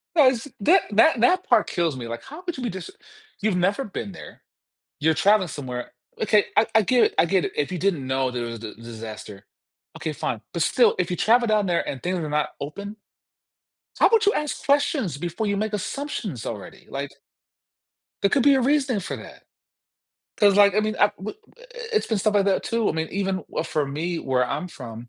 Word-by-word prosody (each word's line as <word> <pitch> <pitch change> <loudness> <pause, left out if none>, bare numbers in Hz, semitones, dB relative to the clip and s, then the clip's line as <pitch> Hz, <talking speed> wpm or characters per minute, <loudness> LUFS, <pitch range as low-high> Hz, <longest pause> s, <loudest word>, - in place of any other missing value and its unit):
No, 295 -5 +7
is 255 +2 0
that 355 - +5
that 230 +6 +5
that 365 +9 +4
part 215 - +4
kills 170 -5 0
me, 120 -2 -6
like, 115 0 -6
how 300 +6 -10
could 350 -4 -5
you 255 - -5
be 240 - -1
just 185 -3 -7 0.5
you've 210 -2 +1
never 195 +9 +1
been 200 0 -6
there, 175 - -12 0.6
you're 160 +1 +3
traveling 200 0 +3
somewhere 125 -5 -6 0.3
okay, 210 -1 +3
I 220 - +5
I 220 - +6
get 245 +5 +4
it - - 0
I 165 - +5
get 185 +1 +2
it. - - -3
If 145 +2 0
you 180 - -2
didn't 170 -7 0
know 130 0 0
there 120 -1 -3
was 115 0 -6
d 110 -1 -8
disaster. 110 -3 -9 0.5
Okay, 155 - -3
fine, 125 -6 -3
but 170 - -1
still, 235 +5 +3
if 180 -1 0
you 180 - -1
travel 235 +5 +3
down 210 -2 +2
there 175 -2 0
and 130 - -5
things 180 +1 -1
are 160 -3 -3
not 150 0 0
open, 200 +9 -6 1.0
how - - +6
about 445 0 +3
you 410 - +4
ask 300 -1 -3
questions 280 - +1
before 175 +7 -3
you 200 0 0
make 215 +1 -2
assumptions 210 - -4
already, 105 -4 -8
like - - -4 1.1
there 200 - +4
could 270 +2 +2
be 280 0 +6
a 265 - +2
reason 270 -3 +2
for 190 - -5
that. - - -12 0.9
'Cause 205 -3 +4
like, 200 -1 +6
I 215 - +4
mean, 215 0 -2
I 205 0 +4
w 200 +2 -5 0.3
i - - -21
i - - -14 0.3
it's 435 - +2
been 220 - +1
stuff 210 +2 +1
like 200 -1 +3
that 195 -1 +1
too. 230 -2 0
I - - 0
mean, 160 0 -2
even 195 -2 -2 0.2
for 150 -2 -1
me 165 +5 -3
where 130 -3 +1
I'm 140 +7 -3
from, 120 -6 -9
195 Hz, 220 wpm, -24 LUFS, 150-225 Hz, 1.1 s, No